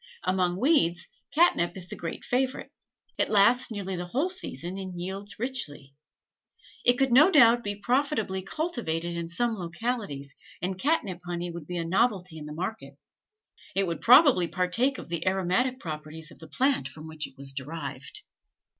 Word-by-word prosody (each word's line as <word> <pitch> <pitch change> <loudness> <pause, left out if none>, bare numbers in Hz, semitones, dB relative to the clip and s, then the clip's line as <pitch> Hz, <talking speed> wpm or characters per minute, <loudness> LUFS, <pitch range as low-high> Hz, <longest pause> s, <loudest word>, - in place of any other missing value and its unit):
Among 185 -1 +1
weeds, 235 - +3 0.3
catnip 195 - +3
is 180 -1 -4
the - - -6
great 165 - -6
favorite. 260 +1 -1 0.5
It - - +2
lasts 220 +5 +4
nearly 195 -4 -3
the 175 0 -4
whole 280 - 0
season 180 - -4
and 185 -2 -6
yields 195 +3 -5
richly. 155 - -4 0.9
It 245 - +6
could 270 -1 +2
no 290 +9 +7
doubt 240 -8 +6
be 205 0 -2
profitably 225 -3 0
cultivated 190 - -3
in 170 -1 -4
some 235 +7 0
localities, 175 - -4 0.3
and 185 +1 -2
catnip 210 - 0
honey 175 0 -4
would 170 -3 -8
be 180 - -4
a 165 - -2
novelty 185 -3 +1
in 150 - -8
the - - -7
market. 160 -5 -5 0.8
It 195 0 +2
would 170 -2 -3
probably 250 - +7
partake 205 +11 +1
of - - -8
the 170 0 -3
aromatic 195 +8 +1
properties 155 -1 -6
of - - -15
the 160 - -11
plant 265 - +1
from 155 +2 -11
which 155 -1 -4
it - - -19
was 135 0 -5
derived. 140 - -6
185 Hz, 165 wpm, -27 LUFS, 170-245 Hz, 0.9 s, no